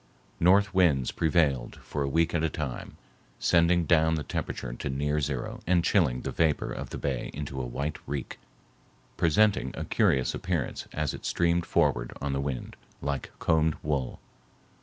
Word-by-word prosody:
North 100 +3 +4
winds 80 -9 +3
prevailed 75 -6 +1
for 75 - -4
a 70 - 0
week 80 +3 +2
at 80 -1 +1
a 80 - +2
time, 70 -4 -5 0.4
sending 85 0 +3
down 80 0 +4
the 75 - -3
temperature - - -4
to 65 - -4
near 75 +3 0
zero 70 -3 -3
and 90 -1 +3
chilling 75 -12 +2
the - - -4
vapor 80 -3 +1
of - - -5
the - - -5
bay 65 -4 -2
into 70 -2 -5
white 65 +4 -3
reek, 70 -2 -4 0.8
presenting 90 -4 +3
a - - -3
curious 65 -2 +2
appearance 85 -7 -3
as 75 -1 -2
it - - -8
streamed 85 0 +1
forward - - +1
on 70 -1 -2
the 70 - -1
wind, 70 -3 -4 0.2
like 70 -1 -3
combed 80 -1 +2
wool. 70 -4 -2
75 Hz, 160 wpm, -28 LUFS, 70-85 Hz, 0.8 s, North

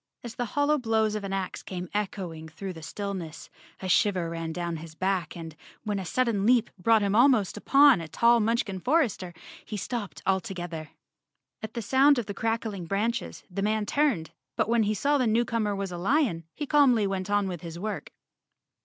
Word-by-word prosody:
As 240 -2 -6
the 245 0 -2
hollow 290 +1 +3
blows 220 -3 +1
of 210 -1 -3
an 195 - -4
ax 195 -1 -3
came 180 -1 -6
echoing 180 -6 -4
through 185 +4 -6
the 165 - -10
still¬ 200 +5 -4
ness, 165 -4 -8 0.3
a - - -2
shiver 180 -2 +2
ran 165 -1 -4
down 170 0 -3
his 160 0 -10
back 185 -2 -1
and, 165 -2 -8 0.3
when 210 -2 -2
a 190 - -5
sudden 230 0 +1
leap 235 +1 +3
brought 220 +3 +4
him 200 0 +1
almost 235 -4 +4
upon 275 0 +5
a 165 - -6
tall 235 +8 +4
Munchkin 215 -4 0
for¬ 315 - +4
ester, 185 -5 -7 0.3
he 210 - -6
stopped 210 0 -5
altogether. 175 -5 -2 0.7
At 220 0 -7
the 235 - -3
sound 270 +5 +5
of 240 - -1
the 200 - -5
crackling 220 -5 -2
branches, 225 +6 -2
the 195 +1 -4
man 215 +1 +1
turned, 245 - +1 0.2
but - - +1
when 235 0 +3
he 215 0 +1
saw 285 +7 +2
the 250 - +2
new 230 +2 +2
comer 215 -4 -1
was 195 -1 -3
a 175 - -5
lion, 205 - +1
he 295 - -3
calmly 265 -7 +4
went 195 -1 -2
on 205 -1 +2
with 175 -4 -5
his 170 -1 -7
work. 210 +4 -4
205 Hz, 200 wpm, -27 LUFS, 180-235 Hz, 0.7 s, upon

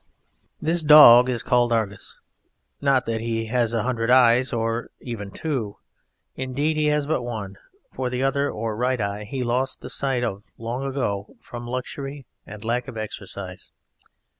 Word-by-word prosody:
This 170 +2 +1
dog 145 -5 +9
is 120 -3 -2
called 120 -1 +2
Argus, 110 -3 -2 0.6
not 135 -3 +2
that 115 -1 -2
he 115 -1 -2
has 120 -1 +1
a 115 -2 0
hundred 120 -2 -1
eyes 125 0 +5
nor 115 0 -2
even 110 -5 -6
two, 120 -5 -4 0.6
indeed 140 +4 -1
he 155 0 +1
has 150 -1 +1
but 150 -3 0
one; 105 -5 -6 0.4
for 130 -1 -2
the 125 +1 -2
other, 140 +1 +1
or 110 0 -3
right 125 +2 0
eye, 100 0 -3
he 130 +4 -4
lost 125 +2 -1
the - - -7
sight 135 -3 0
of 100 -3 -3
long 120 +3 -4
ago 125 -7 -3
from 120 0 -9
luxury 135 +2 -5 0.2
and 105 +1 -10
lack 120 +2 -1
of 115 - -8
exercise. 100 -3 -7
120 Hz, 165 wpm, -23 LUFS, 115-130 Hz, 0.6 s, dog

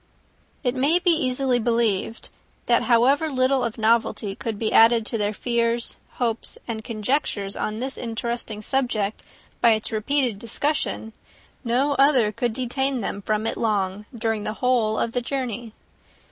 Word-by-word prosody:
It 245 -2 +1
may 280 +6 +3
be 355 0 +3
easily 260 -5 +1
believed, 230 -2 0 0.4
that 235 -1 +3
however 255 +7 +3
little 260 -1 +2
of 235 -2 -3
novelty 220 -2 +1
could 225 0 -4
be 220 +1 -1
added 225 0 +6
to 230 - -2
their 205 0 +1
fears, 235 +1 -1 0.2
hopes, 235 -2 -2
and 220 -2 -4
conjectures, 215 -3 -1
on 215 +1 -3
this 265 +2 -3
interesting 230 -2 -4
subject 220 -5 -1 0.4
by 235 -2 +6
its 220 +1 -2
repeated 230 0 0
discussion, 235 -1 -2 0.5
no 260 +4 +1
other 265 -6 +5
could 235 +1 -1
detain 260 +1 -1
them 200 0 -4
from 215 +2 -1
it - - -1
long, 205 -2 -1
during 225 -3 -2
the 215 - -3
whole 230 -3 +1
of 230 - 0
the 245 - -1
journey. 240 -3 -4
235 Hz, 150 wpm, -24 LUFS, 215-255 Hz, 0.5 s, added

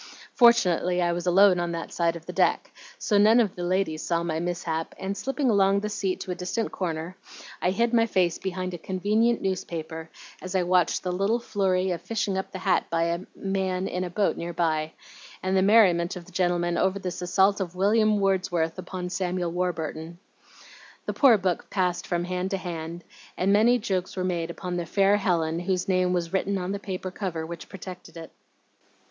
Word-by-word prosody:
Fortunately 180 -7 +4
I 175 -1 +2
was 175 +1 -3
alone 185 0 +5
on 175 0 -2
that 165 0 -5
side 170 -1 0
of 165 -1 -9
the - - -7
deck, - - +1 0.3
so 205 -2 +1
none 220 +3 +6
of 215 -6 +2
the 180 - -6
ladies 175 -3 0
saw 170 -1 0
my 160 -2 -2
mishap 170 -2 -3
and, 195 +1 -3
slipping 270 +4 -2
along 200 -3 +4
the 210 - -3
seat 195 -3 -2
to 185 - -5
a - - 0
distant 185 +5 -3
corner, 170 -1 -4 0.5
I - - +2
hid 230 +5 +1
my 230 -1 +4
face 180 -5 +1
behind 185 -1 -4
a 175 - -6
convenient 210 +7 +1
newspaper, 165 -4 -4 0.3
as 185 +1 -6
I 185 - +3
watched 180 0 +2
the 180 - -1
little 195 +6 +1
flurry 190 -5 0
of 175 - -3
fishing 210 -3 -2
up 190 - -3
the - - -6
hat 190 0 +1
by 165 0 +1
a 170 0 0 0.2
man 190 -1 -2
in 180 +1 -2
a 180 - -4
boat 200 +3 0
near 170 +1 -5
by, 160 -2 0 0.5
and 190 +1 0
the 190 - +4
merriment 190 -4 +4
of 175 -2 -8
the 185 - -16
gentlemen 175 -1 0
over 190 +1 +1
this 180 -2 -5
assault 190 +3 +2
of 180 -2 -4
William 210 +2 +3
Wordsworth 185 -4 0
upon 185 -1 -5
Samuel 180 -2 -2
Warburton. 170 -2 -3 0.9
The - - -2
poor 255 -6 +6
book 185 -3 -2
passed 180 -2 -1
from 175 -1 -1
hand 180 +1 -2
to 195 - -1
hand, 170 -2 -6 0.3
and 195 +2 +2
many 230 +4 +5
jokes 190 -5 -2
were 185 - -1
made 170 -2 -1
upon 180 +1 -4
the 170 -1 -3
'fair 200 +3 +3
Helen' 170 -4 0
whose 185 0 -1
name 185 -1 +2
was 175 -1 -2
written 195 +1 0
on 180 0 -3
the 200 - -3
paper 185 -2 -5
cover 180 -5 -4
which 170 +1 -8
projected 185 -2 -10
it. 165 -1 -9
185 Hz, 200 wpm, -26 LUFS, 175-195 Hz, 0.9 s, none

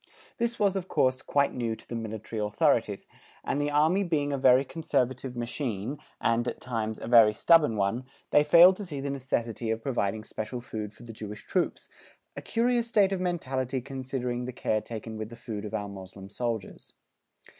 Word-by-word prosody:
This 235 0 0
was, 200 -2 +3
of 190 -2 -3
course, 130 -5 +1
quite 140 -1 +1
new 115 -2 -2
to - - -17
the - - -7
Military 110 -1 -4
authorities, 105 0 +1 0.4
and 145 - -1
the 145 - 0
Army 155 +6 +3
being 145 -5 0
a - - 0
very 130 0 +5
conservative 130 -6 -1
machine, 120 +1 -3 0.2
and, 115 +1 +1
at - - -3
times, 110 -3 -3
a - - -6
very 115 -3 +7
stubborn 155 -4 +5
one, 105 +5 0 0.3
they 145 - +6
failed 170 +5 +8
to 205 - -5
see 145 -4 -5
the 140 0 -3
necessity 120 -4 -2
of 110 0 -2
providing 110 -5 -1
special 110 +3 -5
food 110 -3 -6
for 115 +3 -16
the 115 -1 -9
Jewish 105 -1 -8
troops 180 -2 -1 0.5
a - - -5
curious 235 0 +1
state 205 -4 +3
of 190 -2 -1
mentality 135 -7 -1
considering 125 -2 -4
the 125 - -5
care 110 -2 0
taken 110 0 -7
with 110 0 -5
the 115 - -10
food 110 -3 -6
of 105 - -4
our 105 - -2
Moslem 95 0 -10
soldiers. 115 -1 -4
125 Hz, 190 wpm, -28 LUFS, 110-145 Hz, 0.5 s, failed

